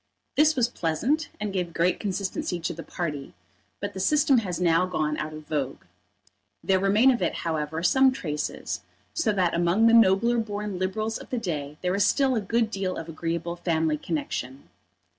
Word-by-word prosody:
This 310 +1 +4
was 245 -3 +3
pleasant 240 - -1
and 210 -2 -3
gave 180 -3 -2
great 175 +2 +2
consistency 190 -3 -2
to 170 - -2
the 165 - -7
party; 150 -5 -5 0.4
but 205 0 -4
the 190 - -6
system 285 +5 +4
has 180 -6 -4
now 175 0 +3
gone 155 -4 -1
out 155 0 -3
of 155 0 -9
vogue. 140 -3 -3 0.8
There 190 -1 +3
remain 210 +7 +5
of 245 - -1
it, - - 0
however, 160 0 -2
some 265 +8 +5
traces, 150 - -4 0.3
so 335 -10 +1
that 185 -4 +1
among 175 +6 +3
the 230 - +6
nobler 230 +2 +5
born 205 -3 -4
Liberals 215 +4 -2
of - - -12
the 250 - -2
day 150 -8 -4
there 180 0 +1
is 200 +1 +2
still 265 +5 +3
a 220 - 0
good 225 +2 0
deal 190 -2 -2
of 165 - -6
agreeable 170 +1 -3
family 160 -3 0
connection. 140 -5 -4
185 Hz, 180 wpm, -26 LUFS, 165-220 Hz, 0.8 s, the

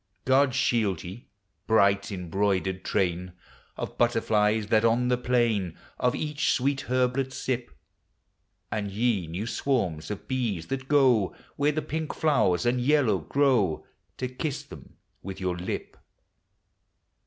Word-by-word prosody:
God 130 0 +3
shield 115 - +1
ve, 95 +7 -9 0.4
bright 100 -2 +3
embroidered 95 0 -1
train 90 -2 -1 0.4
Of - - -6
butterflies, 110 -2 +2
that 110 0 +4
on 120 +2 +3
the 125 - +2
plain 120 -8 +1 0.2
Of 125 0 +2
each 150 -2 0
sweet 135 +2 0
herblet 130 +1 +1
sip; 125 -2 -3 1.0
And 105 -1 -2
ye, 105 -4 0
new 90 +7 -4
swarms 115 - -1
of 105 - -6
bees, 115 -10 -1
that 135 0 -3
go 130 -9 +3 0.2
Where 145 +1 +2
the 155 +1 -2
pink 155 0 -4
flowers 120 - +2
and 125 +1 +2
yellow 125 -7 +3
grow 120 - +1 0.3
To 130 - -2
kiss 140 +3 -4
them - - -13 0.3
with 95 -1 -7
your 90 -2 -1
lip! 90 +1 -5
115 Hz, 130 wpm, -27 LUFS, 95-130 Hz, 1.0 s, that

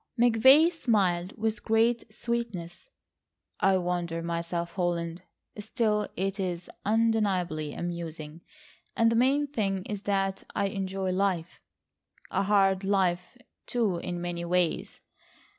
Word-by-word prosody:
McVay 260 +8 +6
smiled 195 - 0
with 220 0 -2
great 225 0 +1
sweetness. 215 -7 -4 0.7
"I 195 0 +4
wonder 175 -2 -2
myself, 170 0 -3
Holland. 175 -2 -2 0.4
Still 210 -1 0
it 195 +2 -2
is 180 -2 -3
undeniably 200 -8 +1
amusing, 165 -2 -5 0.6
and 230 0 +4
the - - +1
main 270 +5 +3
thing 195 -9 -2
is 205 -2 -5
that 195 -1 0
I 200 - +1
enjoy 190 -1 -2
life,—a 185 -2 -4
hard 195 -1 +3
life 190 +1 0 0.3
too 220 -7 0
in 175 +1 -4
many 175 0 -4
ways. 175 -1 0
195 Hz, 110 wpm, -28 LUFS, 175-220 Hz, 0.7 s, McVay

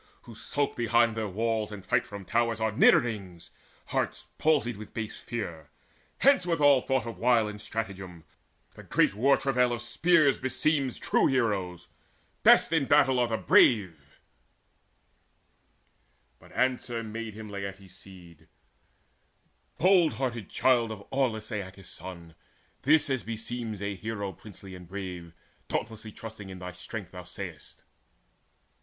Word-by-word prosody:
Who 120 - -12
skulk 140 +5 -2
behind 120 -1 +2
their 110 -1 -2
walls, 110 +2 -1
and 100 -2 -9
fight 120 -1 +1
from 100 -2 -8
towers, 115 +1 0
Are 110 0 0
nidderings, 100 -5 +2 0.4
hearts - - -2
palsied 145 -6 +2
with 105 0 -11
base 110 -2 -5
fear. 85 -10 -6 0.5
Hence 275 -8 +5
with 170 -2 -1
all 145 -3 +6
thought 130 -3 0
of 115 - -7
wile 120 -2 +3
and 105 0 -7
stratagem! 95 -7 -5 0.5
The - - -12
great - - +2
war 135 +7 +3
travail 125 -2 +1
of 120 - -1
the 120 - -5
spear 170 +6 +3
beseems 135 +1 0
True - - +2
heroes. 100 -9 -1 0.5
Best - - +6
in 155 -4 +2
battle 135 -2 +4
are 120 - +3
the 115 -1 -1
brave." 90 - +3 2.2
But - - -18
answer 125 -2 0
made 110 0 -6
to 110 - -8
him 110 - -9
Laertes' 100 -2 -7
seed: 90 -5 -15 1.3
"Bold 180 -2 +4
hearted 120 -6 -3
child 120 -3 +2
of 100 -2 -8
aweless 115 -5 -1
Aeacus' 95 -2 -6
son, 85 -2 -9 0.5
This 155 +2 +4
as 130 -3 0
beseems 115 -2 -5
a 100 0 -2
hero 100 -1 -5
princely 100 0 -12
and 90 -1 -11
brave, 90 -3 -7 0.3
Dauntlessly 110 -1 -4
trusting 110 -3 -9
in 95 - -8
thy 90 0 -7
strength, 90 +2 -7
thou 90 -1 -9
say'st. 90 -4 -9
110 Hz, 145 wpm, -28 LUFS, 95-125 Hz, 2.2 s, all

